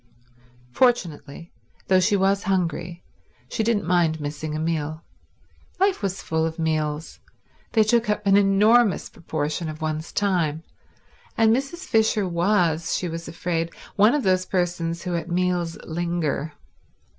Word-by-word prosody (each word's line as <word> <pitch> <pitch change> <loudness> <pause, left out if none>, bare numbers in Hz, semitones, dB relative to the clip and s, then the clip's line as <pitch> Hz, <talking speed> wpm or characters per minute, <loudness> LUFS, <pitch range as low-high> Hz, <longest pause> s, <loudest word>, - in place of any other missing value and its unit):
Fortunately, 170 - 0 0.3
though 185 -1 +5
she 205 +3 +2
was 195 +1 +2
hungry, 175 -2 -1 0.4
she - - -2
didn't 220 -4 +1
mind 170 -2 +2
missing 150 +1 -4
a - - -2
meal. 155 -1 -2 0.8
Life 390 0 +2
was 195 -2 -3
full 160 0 0
of 160 0 -2
meals. 155 -1 -2 0.5
They 220 - +5
took 230 +1 +2
up 210 0 -1
an 195 0 +5
enormous 205 +2 +4
proportion 155 0 -3
of 155 0 -7
one's 155 0 -3
time; 170 -6 0 0.7
and 225 0 +5
Mrs. 275 +7 -4
Fisher 220 -3 +2
was, 170 -2 +1
she 180 - -3
was 165 0 -6
afraid, 165 0 -2 0.3
one 210 +6 +5
of 295 - 0
those 185 -1 +2
persons 170 -2 -1
who 180 -2 -2
at 170 +1 -4
meals 175 -1 0
linger. 165 -3 -2
175 Hz, 140 wpm, -24 LUFS, 160-200 Hz, 0.8 s, though